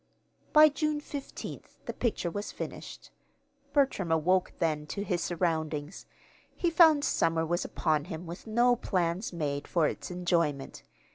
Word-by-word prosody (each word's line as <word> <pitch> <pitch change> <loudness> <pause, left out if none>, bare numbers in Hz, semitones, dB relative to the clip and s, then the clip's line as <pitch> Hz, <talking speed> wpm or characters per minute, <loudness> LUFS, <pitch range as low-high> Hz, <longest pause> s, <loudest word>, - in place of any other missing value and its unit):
By 305 0 +8
June 300 0 -1
fifteenth 285 -2 -8
the - - -4
picture 215 -7 -1
was 205 +4 -4
finished. - - -8 0.6
Bertram 265 - +1
awoke 180 +4 +2
then 155 -2 -1
to 200 +6 -4
his 180 -4 -1
surroundings. 160 -2 -2 0.5
He 345 - 0
found 320 -3 +6
summer 165 0 +1
was 175 +2 0
upon 155 -3 0
him 170 -1 -7
with 175 +6 -9
no 240 +3 +4
plans 180 -2 -1
made 145 -4 -3
for 170 -3 +2
its - - -5
enjoyment. 170 -6 -1
175 Hz, 140 wpm, -29 LUFS, 160-235 Hz, 0.6 s, By